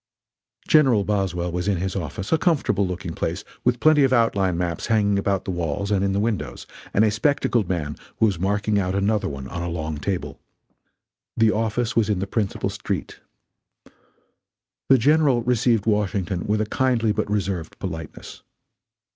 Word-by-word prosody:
General 130 -9 +5
Boswell 95 -4 -1
was 90 +2 -3
in 100 -2 +1
his 95 +2 -3
office; 95 +1 -5
a 160 - +5
comfortable 145 - +1
looking 90 -2 -5
place, - - -3 0.2
with 125 -1 +2
plenty 155 -2 +5
of 135 - +3
outline 100 -7 +2
maps 85 -2 -2
hanging 100 -3 +2
about 100 -1 -1
the - - -2
walls 90 +3 -2
and 100 -1 +2
in 100 - +1
the 100 - 0
windows, 100 - -2 0.3
and 110 - +4
a 105 - +2
spectacled 115 - +1
man 75 -5 -2 0.2
was 100 -6 +2
marking 105 +2 +1
out 95 -1 -1
another 100 +2 +1
one 70 -2 -7
on 85 - -5
a 85 - -3
long 80 -2 -4
table. 95 +3 -3 1.0
The 110 -1 +4
office 115 +2 -1
was 110 -2 +2
in 105 - +1
the 95 - -2
principal 100 0 -2
street. - - -4 1.7
The 135 - +7
General 140 -1 +3
received 120 -3 +2
Washington 100 -4 0
with 105 +1 +1
a - - 0
kindly 115 -1 +1
but 105 - -2
reserved 95 -5 -2
politeness. 80 -4 -7
100 Hz, 165 wpm, -23 LUFS, 90-115 Hz, 1.7 s, The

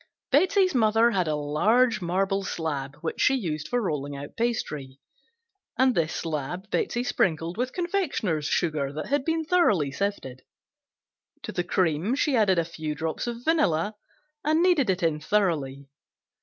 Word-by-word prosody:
Betsey's 370 +5 +4
mother 225 -1 +4
had 185 -6 0
a 155 - 0
large 210 +11 +2
marble 195 +3 0
slab 145 -6 -3
which 165 - -3
she 270 - +4
used 155 - -3
for 245 - 0
rolling 145 - -3
out 145 +1 -9
pastry, 150 - -3 0.8
and 260 0 +4
this 165 -5 0
slab 165 +5 -4
Betsey 240 - 0
sprinkled 165 -7 0
with 250 +2 -2
confectioner's 325 - -1
sugar 150 -5 0
that 155 - -4
had 285 -1 +1
been 325 +1 -1
thoroughly 215 - +2
sifted. 140 -9 -3 1.0
To - - -5
the 175 - -1
cream 175 - 0
she 285 -1 +1
added 205 -5 +3
a 170 - +2
few 160 -2 -5
drops 160 +8 -3
of 235 0 -5
vanilla 215 - +2 0.5
and 315 +3 +2
kneaded 335 - +3
it 185 -1 0
in 160 -2 +1
thoroughly. 150 -7 -1
185 Hz, 155 wpm, -26 LUFS, 155-245 Hz, 1.0 s, Betsey's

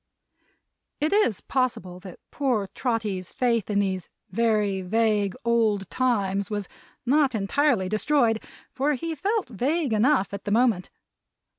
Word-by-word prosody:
It 310 +4 +1
is 410 - +2
possible 225 -9 -2
that 185 -1 -11
poor 245 -9 0
Trotty's 210 -7 -2
faith 235 -5 0
in 205 - 0
these 190 -3 -1 0.2
very 210 -2 +1
vague 210 0 +1
Old 220 -5 +2
Times 200 -6 0
was 205 -3 -3 0.4
not 275 0 +3
entirely 220 0 +1
destroyed, 225 +2 +2 0.3
for 280 +3 0
he 330 +5 -4
felt 400 - -1
vague 270 - 0
enough, 215 -1 +2
at 200 - -5
that 205 - -2
moment. 225 -5 +2
225 Hz, 130 wpm, -25 LUFS, 200-260 Hz, 0.4 s, not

